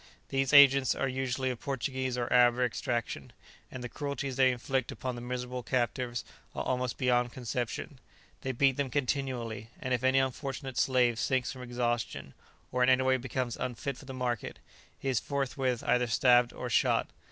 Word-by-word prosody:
These 135 0 0
agents 140 -2 +7
are 135 - 0
usually 130 0 -1
of 125 - -6
Portuguese 130 -1 -2
or 120 -1 -1
Arab 120 -1 +6
extraction; 120 -1 -2 0.4
and 130 -1 -7
the - - -3
cruelties 140 +1 -4
they 130 0 +5
inflict 130 +1 -2
upon 130 -1 -4
the 120 - -7
miserable 125 0 -4
captives 120 0 -1 0.3
are - - -2
almost 125 -1 -1
beyond 125 -1 +2
conception; 125 +3 -4 0.4
they 130 - -2
beat 135 +1 +2
them 140 -2 -1
continually, 125 -6 -2
and 130 - -2
if 125 0 0
any 130 +1 +4
unfortunate 135 0 -2
slave 125 -3 +3
sinks 130 -2 0
from 130 - -9
exhaustion, 120 - -2 0.4
or 125 - 0
in 125 - +5
any 130 0 +4
way 130 0 +3
becomes 125 -1 -3
unfit 130 +2 -3
for 135 - -13
the 135 - -7
market, 125 -3 -2 0.4
he - - -6
is 130 -3 +2
forthwith 135 -3 -1
either 125 0 +2
stabbed 120 +1 +4
or - - -6
shot. - - +2
125 Hz, 175 wpm, -30 LUFS, 120-130 Hz, 0.4 s, agents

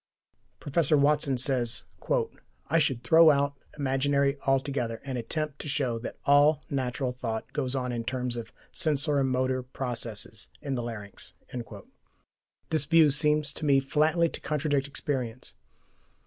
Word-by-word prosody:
Professor 150 +1 +2
Watson 140 -2 +3
says: 125 -2 +2 0.9
"I 165 - +4
should 135 -6 0
throw 160 +7 +7
out 140 -1 +2 0.2
imagery 140 0 +1
altogether 135 -4 0
and 135 -2 -4
attempt 150 +4 -3
to 150 - -5
show 130 -5 -1
that 115 - -7
all 145 +2 +5
natural 130 -1 -1
thought 115 -3 -5
goes 130 -2 -1
on 125 -1 -2
in 120 -1 -3
terms 125 0 -2
of 115 -1 -6 0.2
sensori 145 -2 +2
motor 130 0 0
processes 120 -5 -4
in 140 -3 -4
the 125 - -1
larynx." 110 -4 -8 1.4
This 155 -3 +2
view 160 -1 +5
seems 150 0 +2
to - - -7
me 140 -2 +4
flatly 155 +5 +2
to - - -8
contradict 145 -2 0
experience. 130 -4 -4
135 Hz, 135 wpm, -28 LUFS, 125-150 Hz, 1.4 s, throw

